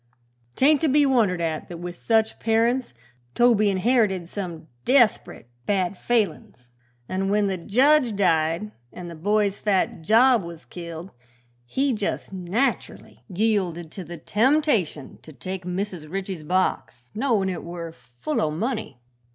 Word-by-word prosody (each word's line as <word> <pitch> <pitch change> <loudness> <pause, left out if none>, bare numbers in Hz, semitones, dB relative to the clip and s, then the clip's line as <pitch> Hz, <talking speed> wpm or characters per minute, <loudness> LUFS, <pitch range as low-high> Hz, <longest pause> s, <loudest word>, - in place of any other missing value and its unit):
'Tain't 290 +3 +4
to 320 - +2
be 290 +1 +4
wondered 225 -10 +2
at 160 -2 -2
that 175 - -8
with 175 +1 -6
such 220 +3 +1
parents 230 - +1 0.4
Toby 230 -4 +4
inherited 195 -3 +1
some 175 -4 -6 0.2
desprit 245 - +2 0.2
bad 195 -2 0
failin's, 180 - -2 0.4
an' 190 +1 -2
when 205 0 +2
the 195 -1 0
jedge 245 - +3
died, 165 +1 +1 0.2
an' 175 -1 -8
the 170 - -8
boy's 205 +4 0
fat 195 -4 0
job 230 +7 +5
was 170 -1 -9
killed, 170 +1 -8 0.6
he 270 - 0
jes' 210 -5 -3
natcherly 195 +8 -2
yielded 180 -5 -1
to 190 - -7
the 170 +1 -8
temptation 225 - +1
to 155 - -13
take 180 +7 -6
Mrs. 180 -4 -4
Ritchie's 190 -3 -4
box, 150 -7 -2
knowin' 220 -5 +1
it 180 -3 -4
were 170 -1 -6
full 125 -1 -4
o' 155 - +1
money. 215 - -3
195 Hz, 140 wpm, -24 LUFS, 170-225 Hz, 0.6 s, job